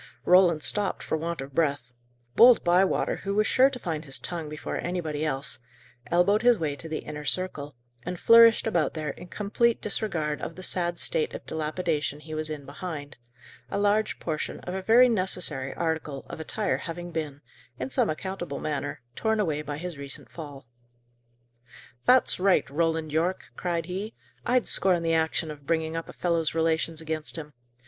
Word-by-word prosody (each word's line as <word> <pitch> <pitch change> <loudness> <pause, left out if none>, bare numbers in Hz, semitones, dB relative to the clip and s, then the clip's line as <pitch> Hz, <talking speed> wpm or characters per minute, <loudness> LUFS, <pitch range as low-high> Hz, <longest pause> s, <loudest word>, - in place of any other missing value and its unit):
Roland 180 -4 +5
stopped 205 -2 +2
for - - -1
want 165 0 -3
of 135 0 -8
breath. 140 -6 0 0.4
Bold 240 +1 +7
Bywater, 180 +2 +2
who 200 +1 -3
was 215 +1 +3
sure 260 +4 +5
to 270 - -6
find 165 -9 -4
his 135 -3 0
tongue 165 -4 -2
before 150 0 -5
anybody 160 -4 -3
else, 140 -3 0 0.5
elbowed 180 +5 +3
his 245 -1 +5
way 155 -5 -2
to 150 +4 -8
the 155 - -4
inner 150 0 -6
circle, 150 -3 -2 0.3
and 180 +3 -5
flourished 230 -1 +7
about 175 -9 0
there, 155 -2 -2
in 180 - -11
complete 220 +5 +1
disregard 165 -8 -1
of 165 - -5
the 185 - -8
sad 175 -1 -1
state 470 - 0
of - - -8
dilapidation 155 -2 -2
he 155 +1 -9
was 155 0 -3
in 150 -2 -6
behind; 145 -1 -7 0.5
a - - -2
large 205 +1 +1
portion 155 -2 -3
of 180 - -6
a 190 - -3
very 235 +6 +6
necessary 180 - -1
article 160 -4 -3
of - - -7
attire 200 +6 -1
having 175 0 -6
been, 150 -4 -4 0.4
in 130 +1 -4
some - - +2
unaccountable 175 -3 -4
manner, 145 -3 -3
torn 220 +6 0
away 155 -7 0
by 145 -1 -5
his 170 -2 -6
recent 140 -1 -9
fall. 145 -5 -9 1.4
"That's 255 -5 +4
right, 185 -7 +3
Roland 160 0 0
Yorke!" 170 +4 -1
cried 170 -2 -2
he. 195 +5 -5 0.3
"I'd 250 0 +3
scorn 180 -3 +3
the 165 0 +1
action 160 0 0
of 145 -2 -12
bringing 160 -1 0
up 165 - -4
a - - -8
fellow's 165 -3 0
relations 160 0 0
against 160 -1 -3
him. 150 -3 -7
165 Hz, 175 wpm, -27 LUFS, 150-185 Hz, 1.4 s, Bold